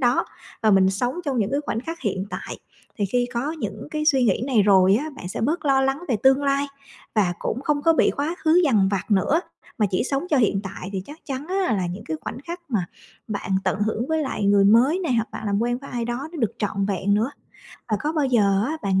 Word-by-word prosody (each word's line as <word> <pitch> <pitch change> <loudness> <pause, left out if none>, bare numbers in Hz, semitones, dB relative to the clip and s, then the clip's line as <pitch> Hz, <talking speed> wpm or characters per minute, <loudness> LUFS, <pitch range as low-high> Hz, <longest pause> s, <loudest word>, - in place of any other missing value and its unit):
đó, 245 -1 +2 0.4
và 220 - +4
mình 190 -1 +5
sống 245 +6 -1
trong 275 -4 -1
những 205 -2 0
cái 280 +1 0
khoảnh 225 - -1
khắc 330 +6 -6
hiện 195 -5 -2
tại. - - -6 0.4
Thì 205 - +1
khi 245 +4 +1
có 265 +6 -1
những 320 - -6
cái 305 0 -2
suy 270 -5 +4
nghĩ 215 -1 +2
này 240 -7 +3
rồi 195 -1 +5
á, 300 +6 -3
bạn 180 - -7
sẽ - - -5
bớt 305 +10 0
lo 270 -2 +4
lắng 270 +2 0
về 240 - +2
tương 265 +1 +5
lai, 280 0 +1 0.5
và 200 -5 +2
cũng 250 - -3
không 290 0 0
có 330 - +5
bị 320 - +3
quá 295 +4 -1
khứ 325 +3 +5
dằn 215 -10 +3
vặt 200 +1 -2
nữa, 210 - +3 0.4
mà 215 - +3
chỉ 185 - +1
sống 275 +3 0
cho 300 - +4
hiện 210 -6 +2
tại. 190 -1 -7
Thì 190 -2 -3
chắc 300 +2 -10
chắn 275 +1 -4
á 375 - 0
là 185 -2 -1
những 175 +4 -6
cái 160 - -3
khoảnh - - -6
khắc 345 +1 -6
mà 200 -7 0 0.4
bạn 200 -3 -4
tận 200 - 0
hưởng 220 +3 -1
với 320 -1 +1
lại 240 -7 -2
người 200 0 +5
mới 240 - +5
này, 335 -9 -1
hoặc 225 -1 0
bạn - - -6
làm 200 -1 +1
quen 240 +1 0
với 275 - -11
ai 240 -1 -2
đó 240 +5 -4
nó 335 - -7
được 225 -7 0
trọn 200 -2 -1
vẹn 200 0 0
nữa. 220 +5 +1 0.6
Và 215 - +1
có 305 +2 -1
bao 300 -4 +1
giờ 205 -6 +3
á 310 +4 -2
bạn 190 -1 +2
240 Hz, 255 wpm, -23 LUFS, 200-285 Hz, 0.6 s, mình